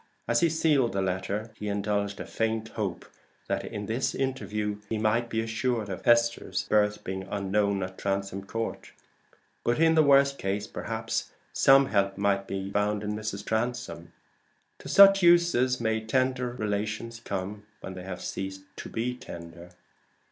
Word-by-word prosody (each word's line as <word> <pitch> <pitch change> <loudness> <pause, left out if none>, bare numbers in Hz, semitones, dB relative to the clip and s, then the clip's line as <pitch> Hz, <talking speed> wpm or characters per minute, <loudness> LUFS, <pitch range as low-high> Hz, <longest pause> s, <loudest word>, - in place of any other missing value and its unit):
As 120 - +3
he 170 - +3
sealed 150 -6 +2
the 95 - 0
letter, 95 +4 -2
he 105 - -5
indulged 100 0 -1
a - - -5
faint 115 0 -2
hope 100 -6 -4 0.4
that - - -1
in 105 - -5
this 115 +5 -1
interview 105 -6 -2
he 110 - -1
might 110 +2 +1
be 110 0 0
assured 115 -1 -1
of 95 - -6
Esther's 115 -5 +3
birth 105 -1 +1
being 95 0 -5
unknown 100 0 0
at 95 0 -7
Transome 95 0 -2
Court; 115 +2 -4 0.7
but 120 +3 +1
in 165 0 +5
the 160 - +6
worst 140 -1 +4
case, 100 +2 -2
perhaps 115 +1 -4 0.2
some 135 0 +6
help 100 -5 +1
might 100 -1 +1
be 95 0 -4
found 105 +1 0
in 105 0 -2
Mrs. 105 -2 -4
Transome. 120 +3 -3 0.7
To - - -9
such 195 0 +8
uses 170 -8 +4
may 110 -1 0
tender 130 +2 0
relations 110 +1 -3
come 100 -1 -5
when 95 - -7
they 90 - -8
have 90 -1 -6
ceased 95 0 -5
to - - -7
be 120 +2 -2
tender! 85 -6 -10
110 Hz, 160 wpm, -28 LUFS, 100-120 Hz, 0.7 s, such